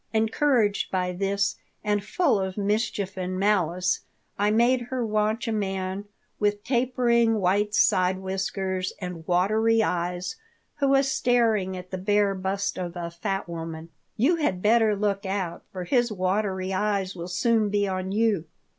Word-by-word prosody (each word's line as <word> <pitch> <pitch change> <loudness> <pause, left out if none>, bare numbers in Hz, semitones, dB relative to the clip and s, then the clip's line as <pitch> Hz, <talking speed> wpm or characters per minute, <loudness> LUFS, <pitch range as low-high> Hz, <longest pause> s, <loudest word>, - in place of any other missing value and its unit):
Encouraged 220 -1 +2
by 180 -1 -1
this 200 +2 0 0.3
and 205 -1 0
full 290 - +1
of 190 0 -3
mischief 205 -1 -1
and 185 0 -3
malice, 185 -2 +1 0.4
I 205 +1 +1
made 240 +4 +3
her 255 -2 -1
watch 215 +2 0
a - - 0
man 195 -2 -2 0.3
with 205 0 0
tapering 240 -2 +2
white 205 +3 +1
side 185 -3 +3
whiskers 190 0 -2
and 180 -4 -7
watery 220 +5 +3
eyes 180 - -2 0.4
who 280 - +1
was 270 0 +3
staring 225 -8 +2
at 180 0 -10
the 185 - -3
bare 205 +1 +2
bust 195 +1 -2
of 175 -1 -4
a 170 -1 -4
fat 195 +3 -3
woman 165 -1 -6 0.3
"You 305 +10 +3
had 295 - 0
better 220 0 +4
look 200 -1 -1
out, 190 -3 -3
for 185 -1 -5
his 240 +5 +1
watery 190 -1 -1
eyes 195 -1 0
will 170 -1 -6
soon 215 +4 +1
be 205 0 +1
on 185 0 -3
you." 210 -5 +1
200 Hz, 155 wpm, -26 LUFS, 185-220 Hz, 0.4 s, better